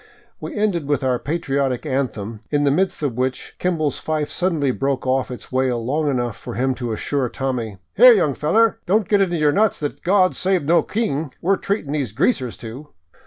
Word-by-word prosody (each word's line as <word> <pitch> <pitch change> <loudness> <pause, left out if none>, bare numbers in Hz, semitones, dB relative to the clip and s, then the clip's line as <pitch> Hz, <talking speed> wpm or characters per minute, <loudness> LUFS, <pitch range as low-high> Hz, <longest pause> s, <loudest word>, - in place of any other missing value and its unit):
We - - -7
ended 200 -8 0
with 145 -1 0
our 125 -2 +1
patriotic 140 -4 -1
anthem, 115 -6 -3
in 145 -1 +1
the 140 - +3
midst 180 +1 0
of 140 -5 0
which 130 0 -2
Kimball's 160 -5 0
fife 155 -2 -2
suddenly 165 -7 0
broke 135 +1 -2
off 130 0 +1
its 125 - -9
wail 130 -3 0
long 150 +4 0
enough 120 -5 -1
for - - -8
him 130 +2 +1
to 120 -1 -2
assure 130 +4 -1
Tommy: 120 -7 -3
" - - -51
Here, 250 +4 +10
young 155 -10 +2
feller, 220 - +2
don't 205 +1 +2
get 205 -2 +3
it - - +5
into 175 -2 -2
your 150 -2 +3
nut 210 +5 +3
that 145 -1 -4
's - - -31
' - - -44
Gawd 185 0 +3
save 185 -3 +1
no 170 +4 +4
King 160 - -2
' - - -43
we 185 - +2
're - - +1
treatin' 195 -8 -2
these 140 -8 -2
greasers 130 - 0
to 120 +6 -9
145 Hz, 220 wpm, -21 LUFS, 130-175 Hz, -, Here